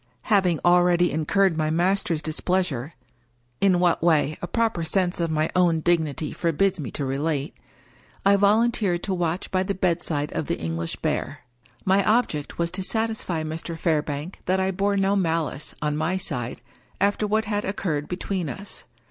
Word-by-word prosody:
Having 185 -5 +3
already 175 0 +4
in 155 0 -2
curred 195 -4 +3
my 155 -1 0
master's 175 -1 +1
displeasure 160 -4 -1 0.3
— 120 0 -41
in 190 -3 +4
what 175 -1 +2
way, 155 -2 +3
a 175 - -3
proper 225 -3 0
sense 180 +1 +1
of 170 -1 0
my 155 0 +1
own 175 -3 +3
dignity 160 -3 0
forbids 180 +3 +1
me 135 -6 -4
to 145 - -3
relate 140 +3 -2 0.4
— - - -30
I 200 +1 +6
volun 210 +4 +4
teered 180 -7 0
to 195 - -1
watch 175 0 -2
by 185 - +2
the 195 +1 -2
bedside 170 -5 -1
of 155 - -2
the - - -1
English 80 0 -3
Bear. - - -2 0.4
My 195 +1 +4
object 215 -11 0
was 170 0 -1
to 190 +1 -3
satisfy 220 -6 -1
Mr. 160 +1 -5
Fairbank 155 0 -1
that 185 +1 +2
I 190 0 +1
bore 200 +2 0
no 195 +1 +2
malice, 165 -5 -1
on 150 0 0
my 160 +5 0
side, 125 -11 -3 0.4
after 205 +2 +1
what 215 +1 +1
had 205 0 -1
occurred 160 -7 -2
between 180 -2 -3
us. 200 +6 -8
175 Hz, 175 wpm, -24 LUFS, 155-195 Hz, 0.4 s, I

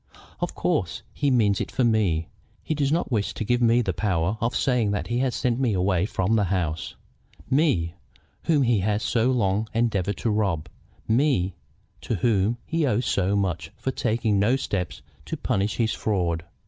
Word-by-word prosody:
Of - - -3
course - - -1
he 145 - 0
means 110 -6 +3
it - - -3
for 130 - 0
me. 100 -9 +2 0.4
He - - -1
does 145 -2 0
not 165 -2 0
wish 105 -4 0
to - - -3
give 120 +3 +1
me 120 +1 +4
the - - -1
power 95 -1 0
of 115 +2 0
saying 125 -6 +2
that 100 - -1
he 125 +2 +1
sent 125 0 -1
me 125 -5 +1
away 95 0 +1
from 100 0 0
the 105 -2 +2
house, 85 -4 -2 0.6
me, 130 - +2 0.5
whom 155 -4 +3
he 120 -4 +3
has 105 +3 0
so 115 +3 +2
long 110 -4 +1
endeavored 105 -4 0
to 115 - -1
rob, 95 -8 0 0.4
me, 115 -6 +2 0.5
to 115 - -2
whom 105 +2 +1
he 165 -1 0
owes 120 0 +1
so 100 +1 +1
much 90 -6 -1
for 135 - -2
taking 110 -4 0
no 110 +6 +3
steps 95 -9 -3 0.2
to - - -4
punish 100 +2 0
his 115 -2 +1
fraud. 85 -6 -1
110 Hz, 180 wpm, -25 LUFS, 95-120 Hz, 0.6 s, me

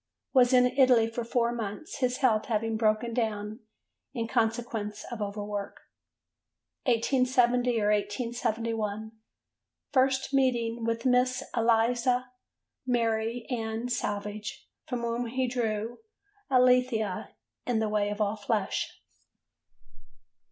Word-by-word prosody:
Was 250 -2 +5
in 250 -1 +6
Italy 250 -3 +4
for 230 +1 -4
four 235 0 +1
months, 230 - -5
his 250 -1 +1
health 230 -6 +2
having 225 0 0
broken 220 +1 +1
down 215 -2 -2 0.6
in 230 -2 -2
consequence 225 -2 -1
of 235 -3 -5
over 205 0 -3
work. 205 -1 -5 1.1
1870 250 -1 +2
or 210 0 +2
1871. 220 0 -2 0.8
First 265 0 +2
meeting 240 -4 +1
with 230 +1 -1
Miss 250 0 +3
Eliza 240 +2 +2 0.6
Mary 230 -1 0
Ann 225 0 -2
Savage, 210 -3 -4 0.2
from 250 -2 -3
whom 235 +1 -2
he 255 +2 -1
drew 230 -2 -2 0.5
Alethea 250 -6 +2 0.3
in 245 -2 +1
The 220 0 +1
Way 210 -1 +1
of 205 +1 -4
All 210 0 +1
Flesh. 210 -1 -2
230 Hz, 110 wpm, -28 LUFS, 215-250 Hz, 1.1 s, in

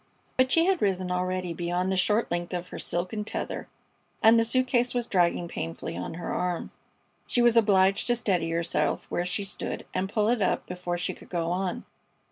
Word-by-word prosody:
But 255 0 +3
she 330 0 +4
had 380 -1 +2
risen 185 -2 0
already 180 -1 -1
beyond 175 +2 -1
the - - +1
short 210 +4 +2
length 175 +1 -2
of 175 0 -5
her - - -7
silken 185 +5 -2
tether, - - -4 0.6
and 225 +1 +7
the - - +4
suit 255 +3 +2
case 245 -1 +1
was 245 -1 0
dragging 175 -4 +1
painfully 80 - -5
on 90 - -5
her 175 - -4
arm. 180 -1 -2 0.6
She 240 - +2
was 240 -1 +5
obliged 195 -3 +4
to 240 - +3
steady 185 -8 +1
herself 170 +1 0
where 175 - 0
she 185 +3 -2
stood 195 - -3
and 190 +1 -1
pull 215 -2 +2
it 240 -2 +1
up 190 - +1
before 180 -1 -4
she 175 - -2
could - - -15
go 170 -1 -1
on. 180 0 -2
185 Hz, 200 wpm, -27 LUFS, 175-225 Hz, 0.6 s, and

